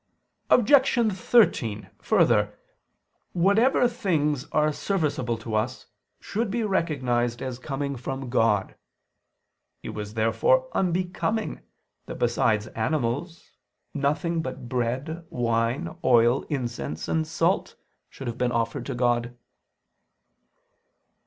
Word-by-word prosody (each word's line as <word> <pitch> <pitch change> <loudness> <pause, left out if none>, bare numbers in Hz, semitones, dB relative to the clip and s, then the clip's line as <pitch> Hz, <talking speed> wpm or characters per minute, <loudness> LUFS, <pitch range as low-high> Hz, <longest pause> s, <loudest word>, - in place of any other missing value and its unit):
Objection 245 -2 +4
13: 170 - +2
Further, 115 - +2 0.8
whatever 210 +8 +4
things 155 - 0
are 150 0 +2
serviceable 145 - -1
to 115 0 -7
us 110 +4 -1 0.3
should 220 +1 -2
be 230 +3 -1
recognized 130 - 0
as 130 -1 -5
coming 140 +1 -3
from 135 +1 -5
God. 115 -5 +1 1.1
It - - -6
was 105 0 -6
therefore - - +2
unbecoming 185 +4 -1 0.5
that - - -6
besides 105 -1 +1
animals, 145 +7 -2 0.4
nothing 150 +3 0
but 130 -3 -6
bread, 130 +7 -2
wine, 115 +1 -1
oil, 120 +1 +4
incense, 120 - -4
and 160 -1 0
salt 165 +3 0 0.3
should 120 -4 -6
be 125 - +2
offered 115 -2 -1
to 135 - -3
God. 120 0 0
135 Hz, 100 wpm, -25 LUFS, 120-175 Hz, 1.1 s, Objection